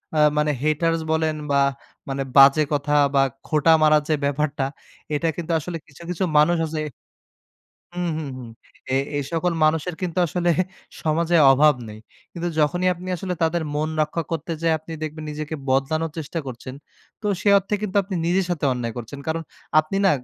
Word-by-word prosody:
আ - - +1 0.2
মানে 150 0 +2
হেটার্স 165 +2 +1
বলেন 160 -1 +1 0.2
বা 140 - +3 0.5
মানে 135 0 -2
বাজে 140 +3 +8
কথা 145 +1 0 0.2
বা 135 - +5 0.2
খোঁটা 155 +1 +3
মারার 155 -1 +5
যে - - +3
ব্যাপারটা 145 0 -1 0.5
এটা 165 +3 0
কিন্তু 170 0 -4
আসলে 165 +2 -5
কিছু, 140 +3 -17
কিছু 180 +1 -2
মানুষ 170 +3 +5
আছে 155 0 -4 1.2
হুম, 180 0 -2
হুম, 155 - -4
হুম 120 -2 -9 0.4
এ - - +2 0.2
এ - - +1
সকল 170 +1 +1
মানুষের 160 +2 +1
কিন্তু 180 0 -2
আসলে 175 +1 0 0.5
সমাজে 165 +2 +2 0.2
অভাব 150 +2 +5
নেই। 105 0 -9 0.3
কিন্তু 175 0 -3
যখনই 175 +5 +2
আপনি 180 +1 -9
আসলে 180 +1 -3
তাদের 165 +1 +1
মন 150 +1 0
রক্ষা 165 +2 -2
করতে 165 0 -3
যায়ে 165 -1 +3
আপনি 160 +1 -10
দেখবেন 155 0 -5
নিজেকে 155 +1 -5
বদলানোর 155 +5 +1
চেষ্টা 160 +2 -4
করছেন। 130 +1 -7 0.5
তো 210 - -4 0.2
সে 205 - +2
অর্থে 195 +2 -3
কিন্তু 205 -1 -3
আপনি 190 0 -6
নিজের 185 +2 +2
সাথে 170 -4 -1
অন্যায় 120 -2 -3
করছেন। 120 +4 -7
কারণ 160 +1 -1 0.4
আপনি 155 +5 -5
না, - - +6
155 Hz, 175 wpm, -23 LUFS, 150-170 Hz, 1.2 s, বাজে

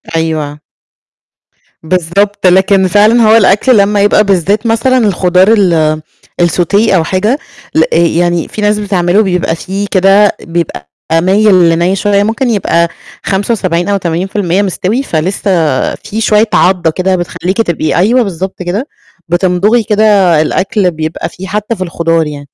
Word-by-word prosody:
أيوه. 155 -2 -3 1.2
بالضبط، 185 +4 0
لكن 190 +1 +3
فعلًا 215 +5 +3
هو 220 0 +4
الأكل 215 +4 +3
لمّا 200 0 +2
يبقى 205 +1 +3
بالذات 200 +3 0
مثلًا 230 +3 +1
الخضار 185 -4 +2
ال 160 -5 +1 0.4
السوتيه 185 +5 +1
أو 165 - +2
حاجة، 210 - -1 0.4
ل 160 - +4
آآ - - +2
يعني 170 0 0
فيه 215 - -7
ناس 210 0 +1
بتعمله 190 0 +1
بيبقى 180 -3 -1
فيه 195 +4 -5
كده 195 +2 +4
بيبقى 165 - -4 0.2
مايل 185 +1 +3
لني 170 +3 +1
شوية، 200 0 +1
ممكن 225 +4 -1
يبقى 170 -5 0 0.4
75 190 -3 -1
أو 200 - +1
80% 185 +1 -2
مستوي، 205 +5 -2
فلسه 185 - -2 0.5
فيه 215 - -7
شوية 215 +1 +2
عضّة 180 -3 +2
كده 185 +3 -1
بتخليكِ 180 +2 -4
تبقي 170 -6 -2
أيوه 235 +8 +2
بالضبط 190 -1 -5
كده، 205 - -3 0.4
بتمضغي 185 +6 +1
كده 215 -1 0 0.4
الأكل 190 +3 0
بيبقى 160 0 -5
فيه 190 +2 -10
حتى 210 +3 -3
في 185 - -11
الخضار 165 -2 -1
يعني. 145 -1 -7
190 Hz, 140 wpm, -11 LUFS, 170-210 Hz, 1.2 s, هو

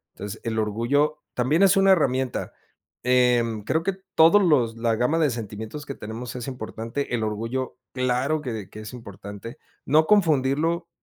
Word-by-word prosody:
Entonces, 100 +2 -7
el 110 -1 -2
orgullo 130 +8 0
también 145 +9 +2
es 195 +1 +5
una 195 0 +5
herramienta, 130 -7 +1 0.5
eh, 125 -1 +4 0.2
creo 160 +6 0
que 195 - 0 0.2
todos 170 +6 +7
los 125 -9 +3
la 115 -1 +1
gama 125 +8 +1
de 155 -3 +3
sentimientos 110 +5 -6
que 140 - -5
tenemos 115 +4 -7
es 125 +1 -5
importante, 120 +1 -5
el 110 - -2
orgullo 115 +5 -3 0.2
claro 130 +4 0
que 110 -8 -5
que 110 - -9
es 110 +3 -9
importante, 100 0 -9 0.3
no 155 +3 +4
confundirlo 165 -2 +2
125 Hz, 160 wpm, -24 LUFS, 115-150 Hz, 0.5 s, todos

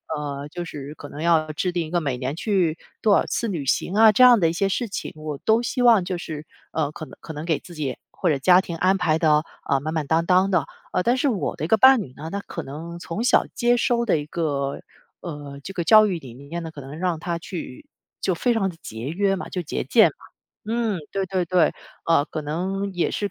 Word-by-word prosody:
呃， 145 -1 -5
就 175 +4 -6
是 145 -3 -7
可 145 - -10
能 150 - -8
要 160 -2 +2
制 175 +4 -2
定 175 -2 -1
一 155 - -9
个 175 - +2
每 140 -6 -2
年 130 +2 -3
去 175 -2 0 0.2
多 210 - +4
少 - - +3
次 230 - -2
旅 165 -8 -3
行 175 - 0
啊， 220 +1 +7
这 255 - +5
样 245 -3 +8
的 165 - +3
一 165 - -2
些 195 +3 0
事 235 +4 -1
情， 195 - -5
我 155 -2 -5
都 220 +1 +3
希 245 +1 -2
望 230 -7 +5
就 180 -1 -2
是， 155 -3 -7 0.3
呃， 155 -2 0
可 155 - -7
能 - - -14
可 160 - -8
能 150 +1 -6
给 160 -3 0
自 175 - -13
己 140 -5 -3
或 185 - -1
者 145 -3 +1
家 180 +6 +6
庭 170 -3 -6
安 185 +3 +3
排 160 -4 +1
得， 155 -2 +3 0.3
呃， 140 -1 +2
满 155 +2 -3
满 155 -3 -2
当 165 +2 +2
当 185 +2 +4
的。 180 -4 +2 0.3
呃， 180 - +1
但 240 - +3
是 285 - +1
我 220 -8 -1
的 155 - -2
一 - - -3
个 220 - +5
伴 260 +2 +7
侣 130 -9 -9
呢， 160 +3 -7
他 200 - -2
可 - - -7
能 165 +5 -7
从 170 +4 -5
小 250 - +4
接 240 0 +2
收 235 0 +1
的 190 -8 +2
一 145 - -4
个， 145 -4 -2 0.4
呃， 145 -4 -8
这 195 - -8
个 175 - -2
教 215 +5 +7
育 185 -4 -1
理 130 -6 -11
念 140 +7 -7
呢， 160 - -6
可 155 - -11
能 135 +3 -9
让 175 -2 -1
他 170 0 -3
去 165 -6 -8 0.4
就 185 - +1
非 240 +8 +1
常 205 -4 +1
地 170 - -11
节 110 +3 -7
约 195 +4 +1
嘛， 190 - -6
就 180 - -3
节俭 160 - +3
嘛。 - - -7 0.6
嗯， 230 -4 0
对 195 -1 -1
对 185 -1 -1
对。 175 -2 +3 0.3
呃， 165 -3 +3
可 155 - -5
能 190 +6 -3
也 180 -2 0
是 205 -1 -2
170 Hz, 275 characters per minute, -23 LUFS, 150-195 Hz, 0.6 s, 样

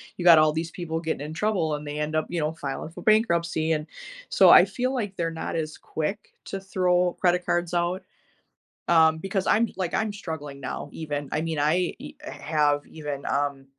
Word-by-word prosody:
you 180 - -5
got 170 -2 +8
all 155 0 +4
these 165 +1 -3
people 165 -3 -4
getting 160 -3 -3
in 155 - -6
trouble, 175 -4 0
and 150 0 -7
they 145 +1 -5
end 150 +1 -2
up, 155 - +1
you 175 - -2
know, 155 0 -1
filing 160 - -5
for 170 +2 -11
bankruptcy, 170 -7 +2
and, 150 -1 -2 0.4
so, - - +6
I - - +10
feel 255 +1 -2
like 210 -7 -3
they're 170 -1 0
not 165 - -5
as 155 -1 -4
quick 160 +7 -4
to 195 - -5
throw 180 -2 +1
credit 180 -1 +2
cards 175 0 0
out. 175 +2 0 0.8
Um, 160 -2 +5
because 195 +3 -2
I'm 230 +2 +4
like, 185 -3 -2
I'm 220 -1 -1
struggling 155 -8 -7
now - - -5
even. 145 -3 -4
I 150 - 0
mean, 165 -1 -3
I 160 +5 +1
h 290 +3 -9
have 150 - 0
even, 145 -3 -6
um, 140 -1 -1
165 Hz, 200 wpm, -25 LUFS, 155-180 Hz, 0.8 s, I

